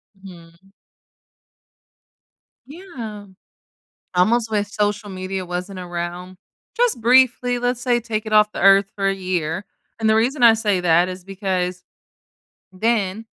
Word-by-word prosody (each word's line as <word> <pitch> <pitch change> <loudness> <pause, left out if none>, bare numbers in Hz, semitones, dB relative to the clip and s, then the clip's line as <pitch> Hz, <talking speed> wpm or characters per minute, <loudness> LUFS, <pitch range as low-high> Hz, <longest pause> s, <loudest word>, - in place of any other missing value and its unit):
Mhm. 180 -1 -16 2.0
Yeah. 255 - -9 0.9
Almost 220 +5 +2
wish 205 -1 0
social 205 0 -1
media 185 0 -5
wasn't 180 +2 -5
around. 175 +1 -6 0.4
Just 480 - +1
briefly, 245 0 +3
let's 245 0 -1
say, 245 -1 +1
take 225 -2 -4
it 215 - -4
off 210 0 +5
the - - -6
earth 195 0 +5
for 195 -1 -1
a 195 - +2
year. 180 -2 -3 0.3
And 220 - +1
the 220 - +4
reason 245 +4 +1
I 230 - +8
say 210 -4 0
that 175 +1 +3
is 185 -1 -8
because 185 -2 -3 0.9
then 215 +1 -1
200 Hz, 130 wpm, -21 LUFS, 185-225 Hz, 2.0 s, I